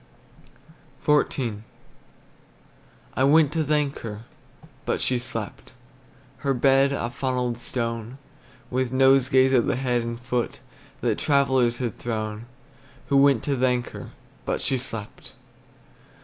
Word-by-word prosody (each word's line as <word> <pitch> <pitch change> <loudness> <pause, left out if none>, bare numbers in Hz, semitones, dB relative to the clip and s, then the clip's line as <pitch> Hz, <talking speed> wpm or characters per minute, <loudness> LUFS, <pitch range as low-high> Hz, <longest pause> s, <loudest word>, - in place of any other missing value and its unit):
XIV. 130 -7 +1 1.5
I 130 - +1
went 150 +1 +5
to 160 -1 +1
thank 150 -1 0
her, 110 -1 -7 0.6
But - - -1
she 125 -1 +1
slept; 115 0 -6 0.6
Her 135 -1 -1
bed 135 +2 +4
a 120 -4 -2
funnelled 125 -2 -2
stone, 115 0 -4 0.5
With 130 -1 0
nosegays 130 0 +4
at 125 -3 +3
the - - +1
head 125 -1 0
and 115 0 -5
foot, 125 -1 -2 0.4
That - - 0
travellers 130 -4 +2
had 120 -4 -4
thrown, 110 -1 -4 0.6
Who 140 - +4
went 135 -4 +4
to 140 - 0
thank 125 -1 0
her; - - -8 0.3
But - - -2
she 130 - +2
slept. 115 -4 -7
130 Hz, 120 wpm, -25 LUFS, 120-135 Hz, 1.5 s, went